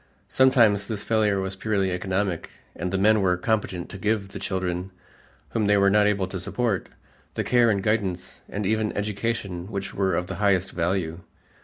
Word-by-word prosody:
Sometimes 115 Hz, -6 st, +4 dB
this 105 Hz, -2 st, -3 dB
failure 105 Hz, -3 st, +2 dB
was 95 Hz, 0 st, -3 dB
purely 95 Hz, -1 st, 0 dB
economic 95 Hz, 0 st, -2 dB, 0.3 s
and 90 Hz, +2 st, -3 dB
the 95 Hz, -, 0 dB
men 105 Hz, +2 st, +4 dB
were 90 Hz, -2 st, +2 dB
competent 95 Hz, -3 st, -1 dB
to 100 Hz, -, -8 dB
give 105 Hz, 0 st, 0 dB
the -, -, -7 dB
children, 90 Hz, -1 st, -2 dB, 0.6 s
whom 110 Hz, -3 st, 0 dB
they 105 Hz, 0 st, +4 dB
were 100 Hz, 0 st, +4 dB
not 105 Hz, 0 st, +4 dB
able 100 Hz, -2 st, +1 dB
to 95 Hz, -, -4 dB
support, 110 Hz, +1 st, -1 dB, 0.5 s
the -, -, -1 dB
care 120 Hz, -2 st, +4 dB
and 100 Hz, -3 st, +1 dB
guidance 95 Hz, -4 st, -1 dB
and 105 Hz, 0 st, -3 dB
even 110 Hz, +1 st, +1 dB
education 100 Hz, -3 st, -2 dB
which 100 Hz, -1 st, -4 dB
were 95 Hz, -3 st, +1 dB
of 90 Hz, -, -1 dB
the -, -, -6 dB
highest 95 Hz, -2 st, +2 dB
value. 85 Hz, -1 st, -1 dB
100 Hz, 180 wpm, -25 LUFS, 95-105 Hz, 0.6 s, Sometimes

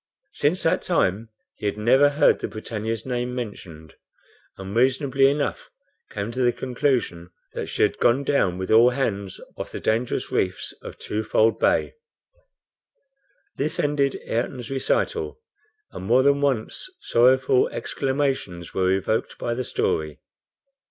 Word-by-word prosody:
Since 155 Hz, +6 st, 0 dB
that 165 Hz, -, +2 dB
time 110 Hz, -, 0 dB, 0.2 s
he 105 Hz, -, -4 dB
had 100 Hz, -, -2 dB
never 130 Hz, +7 st, +5 dB
heard 145 Hz, +1 st, +3 dB
the -, -, -3 dB
BRITANNIA's 110 Hz, 0 st, -4 dB
name 125 Hz, -1 st, -2 dB
mentioned, 85 Hz, -, -7 dB, 0.6 s
and 95 Hz, +1 st, -7 dB
reasonably 135 Hz, +2 st, +3 dB
enough 145 Hz, 0 st, -2 dB, 0.4 s
came 100 Hz, +3 st, -4 dB
to 130 Hz, +2 st, -3 dB
the 120 Hz, -1 st, +4 dB
conclusion 125 Hz, -10 st, -1 dB, 0.2 s
that -, -, -4 dB
she -, -, 0 dB
had -, -, +1 dB
gone 125 Hz, +4 st, +3 dB
down 95 Hz, -11 st, +1 dB
with 95 Hz, 0 st, -4 dB
all 115 Hz, +3 st, +7 dB
hands 100 Hz, -7 st, -2 dB, 0.2 s
off -, -, -6 dB
the -, -, -5 dB
dangerous 115 Hz, +3 st, -1 dB
reefs -, -, -1 dB
of -, -, -9 dB
Twofold 110 Hz, +1 st, +1 dB
Bay. -, -, +2 dB, 1.6 s
This 150 Hz, +3 st, -2 dB
ended 145 Hz, -2 st, +1 dB
Ayrton's 120 Hz, +2 st, -3 dB
recital, 440 Hz, -, -1 dB, 0.5 s
and -, -, -8 dB
more 125 Hz, +5 st, +4 dB
than 140 Hz, +1 st, +3 dB
once 135 Hz, -, -1 dB
sorrowful 130 Hz, +2 st, +3 dB
exclamations 130 Hz, -, -2 dB
were 95 Hz, -1 st, +1 dB
evoked 95 Hz, +3 st, -1 dB
by 120 Hz, -, -2 dB
the 130 Hz, +2 st, -2 dB
story. 75 Hz, -9 st, -1 dB
120 Hz, 140 wpm, -24 LUFS, 105-135 Hz, 1.6 s, all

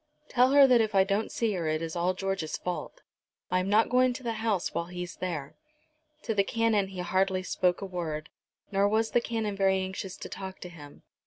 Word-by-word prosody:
Tell 250 Hz, 0 st, +4 dB
her 280 Hz, 0 st, +8 dB
that 250 Hz, -3 st, +5 dB
if 215 Hz, -2 st, -1 dB
I 190 Hz, -, +6 dB
don't 200 Hz, +3 st, -1 dB
see 225 Hz, -3 st, 0 dB
her 170 Hz, -4 st, -2 dB
it 155 Hz, 0 st, 0 dB
is 165 Hz, 0 st, -5 dB
all 175 Hz, +2 st, +1 dB
George's 195 Hz, -4 st, -2 dB
fault. 180 Hz, -, -5 dB, 0.5 s
I 185 Hz, -, +3 dB
am 185 Hz, +1 st, -2 dB
not 215 Hz, +2 st, +4 dB
going 250 Hz, +1 st, +3 dB
to 260 Hz, -, -8 dB
the 230 Hz, -1 st, -1 dB
house 210 Hz, -6 st, 0 dB
while 170 Hz, -, -2 dB
he's 180 Hz, 0 st, -6 dB
there." 155 Hz, -6 st, -4 dB, 0.7 s
To 225 Hz, -, -1 dB
the 200 Hz, -2 st, +3 dB
Canon 225 Hz, -2 st, +1 dB
he 190 Hz, -2 st, -6 dB
hardly 185 Hz, +1 st, +1 dB
spoke 180 Hz, 0 st, 0 dB
a -, -, -3 dB
word, 160 Hz, -5 st, -4 dB, 0.4 s
nor 200 Hz, 0 st, +3 dB
was 220 Hz, +1 st, +1 dB
the 240 Hz, -, +3 dB
Canon 220 Hz, -3 st, -2 dB
very 195 Hz, -1 st, +3 dB
anxious 190 Hz, 0 st, -4 dB
to -, -, -7 dB
talk 190 Hz, 0 st, -7 dB
to 180 Hz, -, -7 dB
him. 150 Hz, -4 st, -13 dB
195 Hz, 220 wpm, -28 LUFS, 180-220 Hz, 0.7 s, her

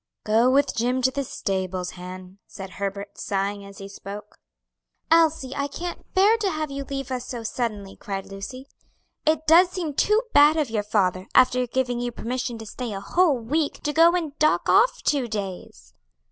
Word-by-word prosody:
"Go 225 Hz, +3 st, +3 dB
with 275 Hz, +2 st, +2 dB
Jim 250 Hz, +3 st, 0 dB
to 260 Hz, -, +4 dB
the 280 Hz, +1 st, -2 dB
stables, 185 Hz, -6 st, -3 dB
Han," 185 Hz, +1 st, -10 dB
said 190 Hz, -2 st, -9 dB
Herbert, 200 Hz, +1 st, -5 dB
sighing 200 Hz, +1 st, -2 dB
as 200 Hz, 0 st, -12 dB
he 195 Hz, -2 st, -8 dB
spoke. 200 Hz, +1 st, -10 dB, 0.7 s
"Elsie, 315 Hz, -5 st, +3 dB
I 280 Hz, 0 st, -1 dB
can't 345 Hz, +5 st, -7 dB
bear 410 Hz, +4 st, +5 dB
to 420 Hz, -3 st, 0 dB
have 310 Hz, -4 st, -3 dB
you 275 Hz, 0 st, -4 dB
leave 275 Hz, -1 st, -5 dB
us 250 Hz, -1 st, -3 dB
so 240 Hz, -2 st, -5 dB
suddenly," 215 Hz, -4 st, -4 dB
cried 195 Hz, -1 st, -5 dB
Lucy; 200 Hz, +7 st, -8 dB, 0.6 s
"it 315 Hz, 0 st, +2 dB
does 345 Hz, +3 st, +6 dB
seem 350 Hz, -5 st, -4 dB
too 425 Hz, -, +2 dB
bad 295 Hz, +2 st, +6 dB
of 295 Hz, -7 st, 0 dB
your 215 Hz, -2 st, 0 dB
father, 190 Hz, -3 st, 0 dB
after 250 Hz, -1 st, +4 dB
giving 245 Hz, 0 st, -1 dB
you 245 Hz, 0 st, -2 dB
permission 240 Hz, 0 st, -4 dB
to 225 Hz, -, -9 dB
stay 235 Hz, +1 st, -5 dB
a 195 Hz, -, -4 dB
whole 330 Hz, -, +2 dB
week, 285 Hz, +6 st, -2 dB
to 295 Hz, -, -1 dB
go 330 Hz, +2 st, +6 dB
and 320 Hz, -5 st, -3 dB
dock 305 Hz, 0 st, +2 dB
off -, -, +4 dB
two 275 Hz, -4 st, +1 dB
days." 185 Hz, -, -6 dB
245 Hz, 185 wpm, -24 LUFS, 200-295 Hz, 0.7 s, does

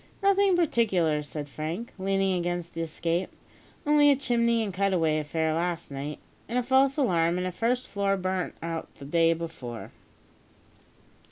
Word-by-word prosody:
"Nothing 395 Hz, -1 st, +4 dB
particular," 195 Hz, -, +2 dB
said 145 Hz, 0 st, -6 dB
Frank, 160 Hz, +10 st, -5 dB
leaning 195 Hz, 0 st, +1 dB
against 175 Hz, -1 st, -2 dB
the 165 Hz, -, -4 dB
escape; 165 Hz, +2 st, -1 dB, 0.6 s
"only 295 Hz, 0 st, +5 dB
a 285 Hz, -, +6 dB
chimney 235 Hz, -3 st, +1 dB
and 200 Hz, -3 st, -4 dB
a -, -, -11 dB
cut 195 Hz, 0 st, +1 dB
away 160 Hz, -3 st, +2 dB
affair 160 Hz, +1 st, -1 dB
last 170 Hz, -1 st, -2 dB
night, 140 Hz, +2 st, -5 dB, 0.3 s
and 240 Hz, -, -1 dB
a 250 Hz, -, +2 dB
false 265 Hz, +3 st, +3 dB
alarm 175 Hz, -, +2 dB
and 180 Hz, -, -1 dB
a 185 Hz, -, -2 dB
first 240 Hz, +7 st, 0 dB
floor 200 Hz, -1 st, 0 dB
burnt 185 Hz, -1 st, -2 dB
out 165 Hz, -1 st, -4 dB
the 140 Hz, -, -11 dB
day 165 Hz, +3 st, +3 dB
before." 160 Hz, -8 st, -7 dB
180 Hz, 165 wpm, -27 LUFS, 165-235 Hz, 0.6 s, a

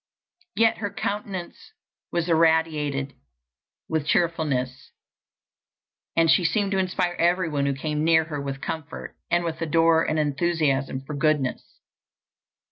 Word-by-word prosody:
Yet 225 Hz, 0 st, +3 dB
her 205 Hz, -2 st, -2 dB
countenance 200 Hz, -3 st, -5 dB, 0.4 s
was 170 Hz, -1 st, -1 dB
irradiated 160 Hz, -4 st, +2 dB, 0.7 s
with 155 Hz, -2 st, -1 dB
cheerfulness, 145 Hz, -8 st, 0 dB, 1.2 s
and 165 Hz, 0 st, +4 dB
she 180 Hz, -, +4 dB
seemed 200 Hz, +3 st, +1 dB
to 195 Hz, -, +1 dB
inspire 180 Hz, -1 st, 0 dB
everyone 165 Hz, -5 st, +1 dB
who 140 Hz, -, 0 dB
came 150 Hz, +2 st, -2 dB
near 160 Hz, 0 st, +4 dB
her 150 Hz, -3 st, -5 dB
with 135 Hz, -1 st, -5 dB
comfort, 160 Hz, -1 st, -6 dB
and 175 Hz, 0 st, +2 dB
with 165 Hz, -1 st, -4 dB
ardor 165 Hz, 0 st, +3 dB
and 155 Hz, -, 0 dB
enthusiasm 145 Hz, -3 st, 0 dB
for 150 Hz, -, -6 dB
goodness. 145 Hz, -2 st, -1 dB
160 Hz, 125 wpm, -25 LUFS, 145-175 Hz, 1.2 s, and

